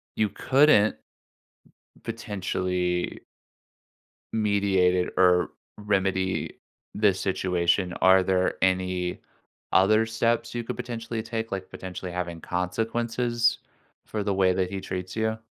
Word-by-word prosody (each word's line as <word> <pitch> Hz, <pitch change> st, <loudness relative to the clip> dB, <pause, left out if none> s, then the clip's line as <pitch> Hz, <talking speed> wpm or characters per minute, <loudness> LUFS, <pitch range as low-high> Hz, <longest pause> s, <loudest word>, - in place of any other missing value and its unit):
you 110 Hz, -1 st, +1 dB
couldn't 130 Hz, -1 st, +4 dB, 1.1 s
potentially 95 Hz, -5 st, -2 dB, 1.1 s
mediate 100 Hz, -4 st, +2 dB
it 90 Hz, -1 st, -1 dB
or 90 Hz, -1 st, +4 dB, 0.3 s
remedy 95 Hz, -2 st, -1 dB, 0.3 s
this 100 Hz, -3 st, +2 dB
situation, 90 Hz, -1 st, 0 dB
are 95 Hz, 0 st, +6 dB
there 95 Hz, 0 st, +1 dB
any 90 Hz, -1 st, 0 dB, 0.5 s
other 110 Hz, +4 st, +4 dB
steps 115 Hz, +1 st, 0 dB
you 120 Hz, -, -2 dB
could -, -, -5 dB
potentially 115 Hz, -1 st, -4 dB
take, 115 Hz, 0 st, -4 dB
like 95 Hz, -1 st, -4 dB
potentially 90 Hz, -1 st, -7 dB
having 90 Hz, -2 st, -4 dB
consequences 115 Hz, +5 st, 0 dB, 0.5 s
for 105 Hz, -2 st, -3 dB
the 100 Hz, -1 st, 0 dB
way 95 Hz, -1 st, +3 dB
that 90 Hz, 0 st, 0 dB
he 100 Hz, -, -4 dB
treats 90 Hz, 0 st, -5 dB
you? 110 Hz, 0 st, 0 dB
95 Hz, 110 wpm, -26 LUFS, 90-110 Hz, 1.1 s, are